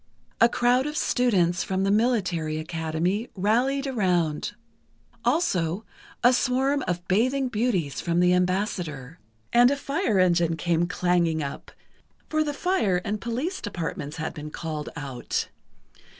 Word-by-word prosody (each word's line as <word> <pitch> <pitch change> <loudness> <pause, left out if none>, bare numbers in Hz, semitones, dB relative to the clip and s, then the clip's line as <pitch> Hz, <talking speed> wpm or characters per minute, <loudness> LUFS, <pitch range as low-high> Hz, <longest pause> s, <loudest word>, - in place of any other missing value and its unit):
A 230 - +6
crowd 245 +3 +2
of 300 +1 -4
students 180 -8 +2
from 190 0 -1
the 195 - +2
Military 185 -9 +1
Academy 160 +6 -2
rallied 245 +8 +1
around; 180 - 0 0.7
also, 190 - +1 0.4
a 245 +1 +6
swarm 265 +2 +1
of 175 0 -3
"bathing 255 +7 +2
beauties" 210 - -1
from 170 0 0
the 180 0 +4
Ambassador, 180 -6 -1 0.3
and 245 +1 +7
a 285 - +1
fire 280 - 0
engine 170 -3 +3
came 170 0 +1
clanging 175 -3 +1
up, 140 - -6 0.6
for 310 0 +2
the 295 - -2
Fire 285 - +1
and 210 0 -2
Police 260 +11 -3
Departments 165 -7 -4
had 160 - -3
been 150 0 -7
called 155 -1 -5
out. 140 -5 -3
185 Hz, 135 wpm, -25 LUFS, 165-245 Hz, 0.7 s, and